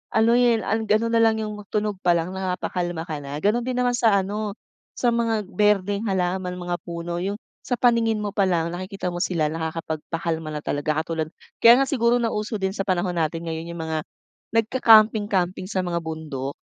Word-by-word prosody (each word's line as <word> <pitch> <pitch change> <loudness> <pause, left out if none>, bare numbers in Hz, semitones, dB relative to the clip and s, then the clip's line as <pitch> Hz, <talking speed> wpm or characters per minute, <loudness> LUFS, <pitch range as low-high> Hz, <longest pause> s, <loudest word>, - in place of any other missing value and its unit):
ano 220 +1 +4
eh, 240 -2 +3 0.2
ga 210 - +4
ano 230 +1 0
nalang 225 -1 +4
'yong 210 0 -4
tunog 210 -2 -2
pa 175 -2 +3
lang 170 +2 -1
napapakalma 180 -2 -3
ka 155 -3 -5
na. 140 0 -7
Gano'n 215 +4 +3
din 255 - -1
naman 250 0 +2
sa 225 -4 +3
ano, 205 +2 -2 0.4
sa 240 - +2
mga 230 -2 0
berdeng 205 +2 +1
halaman, 180 -1 -1
mga 175 -1 -3
puno, 170 0 -4
'yong 195 +3 -2 0.2
sa 245 - -2
paningin 230 -3 +2
mo 205 - -2
pa 200 -1 +2
lang, 170 -2 0
nakikita 185 +1 -4
mo 175 - -4
sila 165 -4 0
nakakapagpakalma 160 0 -3
na 150 - -4
talaga. 155 +2 -1
Katulad 160 -2 -3 0.3
kaya 240 +3 +7
nga - - -1
siguro 240 -3 +2
nauso 220 -2 -1
din 190 -1 -1
sa 195 -1 -4
panahon 180 -1 0
natin 165 +1 -1
ngayon 165 0 -4
yung 165 - -5
mga 160 -1 -3 0.5
nagka-camping 220 -2 +5
camping 185 -2 -1
sa 190 -2 -1
mga 175 -1 -1
bundok. 155 -4 -5
190 Hz, 185 wpm, -24 LUFS, 170-220 Hz, 0.5 s, kaya